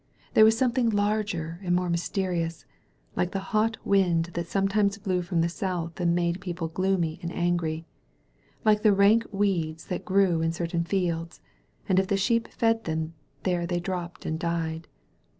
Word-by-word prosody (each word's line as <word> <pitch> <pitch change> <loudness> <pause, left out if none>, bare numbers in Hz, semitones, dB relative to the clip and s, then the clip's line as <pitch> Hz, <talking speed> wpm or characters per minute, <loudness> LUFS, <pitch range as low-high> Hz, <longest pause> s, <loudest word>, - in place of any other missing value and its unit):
This 220 - +7
was 220 +1 +6
something 250 -1 +2
larger 205 -6 -1
and 175 -2 +1
more 180 0 0
mysterious 170 -1 -2 0.2
— - - -37
like 180 - 0
the 195 +1 -5
hot 225 +1 +2
wind 175 -4 +2
that 170 0 -3
some* 195 +2 +1
times 200 0 +1
blew 190 -3 -1
from 175 -1 0
the 165 - +2
south 175 -2 -3
and 170 -1 +2
made 175 +1 0
people 175 -3 -4
gloomy 175 -2 0
and 170 - -3
angiy 170 -2 -1 0.4
— - - -35
^like 210 -1 +4
the 215 -2 +5
rank 205 +4 +4
weeds 175 -6 -1
that 180 - -3
grew 185 -4 +3
in 165 0 0
cer 170 0 -2
tam 170 0 -1
fields, 170 -3 -2 0.5
and 185 -1 +4
if 190 - 0
the 200 - +1
sheep 230 +3 +1
fed 225 -1 0 0.6
there 175 -2 0
they 175 0 -1
dropped 175 -1 -5
and 160 0 -2
died. 165 -1 -2
180 Hz, 180 wpm, -27 LUFS, 170-200 Hz, 0.6 s, This